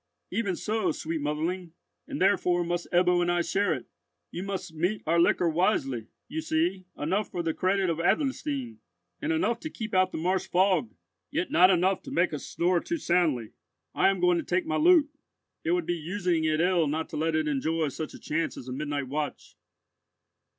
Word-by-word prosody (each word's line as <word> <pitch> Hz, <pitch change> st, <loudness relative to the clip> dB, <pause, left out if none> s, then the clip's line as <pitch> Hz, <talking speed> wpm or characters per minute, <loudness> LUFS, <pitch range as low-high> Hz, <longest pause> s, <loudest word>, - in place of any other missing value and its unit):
"Even 200 Hz, -5 st, 0 dB
so, 220 Hz, +2 st, 0 dB
sweet 160 Hz, 0 st, -4 dB
motherling, 165 Hz, +4 st, -2 dB, 0.3 s
and -, -, -5 dB
therefore 180 Hz, -2 st, +3 dB
must 175 Hz, 0 st, -2 dB
Ebbo 180 Hz, 0 st, +4 dB
and 175 Hz, 0 st, +1 dB
I 175 Hz, 0 st, +1 dB
share 200 Hz, +4 st, +1 dB
it. -, -, -2 dB, 0.5 s
You 175 Hz, -, -5 dB
must 195 Hz, -3 st, -5 dB
mete 180 Hz, +7 st, -1 dB
out 160 Hz, -, 0 dB
your 170 Hz, -, +4 dB
liquor 170 Hz, +1 st, +3 dB
wisely, 145 Hz, -, 0 dB, 0.2 s
you 315 Hz, +5 st, -4 dB
see, 315 Hz, -, 0 dB
enough 190 Hz, +8 st, -1 dB
for 175 Hz, -, -3 dB
the 165 Hz, -1 st, 0 dB
credit 190 Hz, +2 st, +1 dB
of 165 Hz, -1 st, -1 dB
Adlerstein, 145 Hz, -, -1 dB, 0.4 s
and -, -, -1 dB
enough 185 Hz, +9 st, +1 dB
to 315 Hz, -, -5 dB
keep 220 Hz, -7 st, -6 dB
out 185 Hz, 0 st, +3 dB
the -, -, -4 dB
marsh 185 Hz, +4 st, 0 dB
fog, 180 Hz, -, +2 dB, 0.4 s
yet -, -, -2 dB
not 180 Hz, +3 st, +6 dB
enough 185 Hz, +1 st, +2 dB
to -, -, -9 dB
make 175 Hz, -1 st, +1 dB
us 150 Hz, -, -5 dB
snore 175 Hz, +1 st, +1 dB
too 335 Hz, -, -3 dB
soundly. 165 Hz, -, +1 dB, 0.4 s
I -, -, +4 dB
am 195 Hz, -1 st, 0 dB
going 180 Hz, -1 st, +3 dB
to -, -, -3 dB
take 370 Hz, -, 0 dB
my 320 Hz, -, -1 dB
lute; 320 Hz, -2 st, +5 dB, 0.5 s
it 330 Hz, -, -2 dB
would 355 Hz, -1 st, 0 dB
be -, -, 0 dB
using 170 Hz, 0 st, -1 dB
it 155 Hz, 0 st, +1 dB
ill 175 Hz, -2 st, +3 dB
not 160 Hz, +2 st, -2 dB
to -, -, -7 dB
let 160 Hz, +1 st, 0 dB
it 155 Hz, -1 st, +1 dB
enjoy 155 Hz, +2 st, 0 dB
such 155 Hz, +3 st, -6 dB
a -, -, -11 dB
chance 160 Hz, +2 st, -2 dB
as 130 Hz, -, -9 dB
a 125 Hz, -, -4 dB
midnight 145 Hz, 0 st, -3 dB
watch." 150 Hz, +2 st, -4 dB
175 Hz, 200 wpm, -28 LUFS, 155-195 Hz, 0.5 s, not